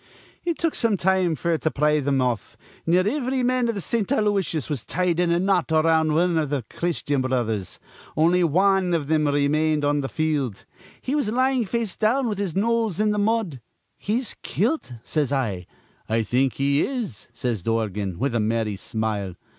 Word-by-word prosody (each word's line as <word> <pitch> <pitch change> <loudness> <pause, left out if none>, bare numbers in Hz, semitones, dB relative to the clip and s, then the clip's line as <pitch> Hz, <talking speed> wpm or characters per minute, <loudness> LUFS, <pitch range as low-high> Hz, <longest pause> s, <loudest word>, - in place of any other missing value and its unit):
"It 340 -2 -1
took 330 -2 0
some 225 -4 +1
time 185 -2 +2
f'r 165 +1 0
to 160 - 0
pry 150 0 +2
thim 135 -1 +1
off. 120 -3 -2 0.3
Near 180 +3 +3
ivry 260 +1 0
man 250 -1 +2
iv 230 - -1
th' 200 - -3
Saint 220 +3 0
Aloysiuses 205 - 0
was 140 -7 -3
tied 180 -1 0
in 175 -1 +2
a 170 - +3
knot 185 -3 +1
around 160 -1 +3
wan 170 0 +2
iv 150 -3 -1
th' 135 -6 -2
Christyan 150 -5 -1
Brothers. 115 -7 -2 0.4
On'y 175 +3 +4
wan 185 +2 +3
iv 150 -4 -2
thim 155 -1 +2
remained 150 +1 +1
on 145 0 +2
th' 135 - -4
field. 150 -9 -1 0.3
He 260 - -3
was 285 -8 0
lyin' 255 0 +2
face 225 -1 -2
down, 240 +4 +1
with 210 -3 -2
his 195 -6 -2
nose 225 -2 +1
in 210 0 +2
th' 210 - -1
mud. 205 - 0 0.4
'He's 230 +4 -1
kilt,' 235 - -1
says 150 -3 -1
I. 105 -11 -1 0.4
'I 115 +1 +1
think 130 +4 +1
he 140 +1 +1
is,' 220 - -3
says 120 -6 -2
Dorgan, 105 -3 -2
with 135 0 -1
a 120 - +1
merry 110 -1 0
smile. 105 -3 -3
160 Hz, 185 wpm, -24 LUFS, 135-210 Hz, 0.4 s, On'y